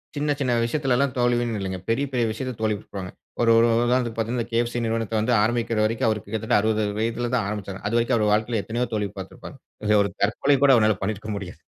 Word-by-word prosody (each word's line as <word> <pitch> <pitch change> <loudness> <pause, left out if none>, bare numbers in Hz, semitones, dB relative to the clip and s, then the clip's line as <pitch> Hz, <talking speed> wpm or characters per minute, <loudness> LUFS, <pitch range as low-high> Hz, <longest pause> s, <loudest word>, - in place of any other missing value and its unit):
சின்ன, 145 +1 0
சின்ன 130 -3 +1
விஷயத்துலலாம் 135 0 0
தோல்வின்னு 120 -2 +1
இல்லங்க. 95 -1 -3
பெரிய, 115 +5 +1
பெரிய 120 -2 +2
விஷயத்துல 125 +2 -5
தோல்வியுற்றுப்பாங்க. 100 -3 -3 0.3
ஒரு, 115 -1 +4
ஒரு 115 +1 +5 0.2
உதாரணத்துக்கு 120 -2 0
பாத்தீங்கனா 115 +1 -2
கே.எஃப்.சி 120 +1 0
நிறுவனத்த 115 -1 -2
வந்து 120 +3 +1
ஆரம்பிக்கிற 115 0 0
வரைக்கும், 115 +1 0
அவருக்கு 105 -3 -3
கிட்டத்தட்ட 110 -1 +1
60 110 0 +1 0.2
வயதுல 115 +1 -1
தான் 115 -5 0
ஆரம்பிச்சாரு. 100 -2 -5
அதுவரைக்கும் 120 +2 +2
அவர் 105 -1 +2
வாழ்க்கைல 110 0 0
எத்தனையோ 120 +2 -2
தோல்வி 105 -1 -1
பாத்திருப்பாரு. 95 - -9 0.3
இதுல 105 0 +4
ஒரு - - -4
தற்கொலை 130 +7 +2
கூட 140 - +6
அவரால 110 -3 +3
பண்ணியிருக்க 110 +1 -3
முடியாது. 95 -3 -8
115 Hz, 190 wpm, -24 LUFS, 105-120 Hz, 0.3 s, கூட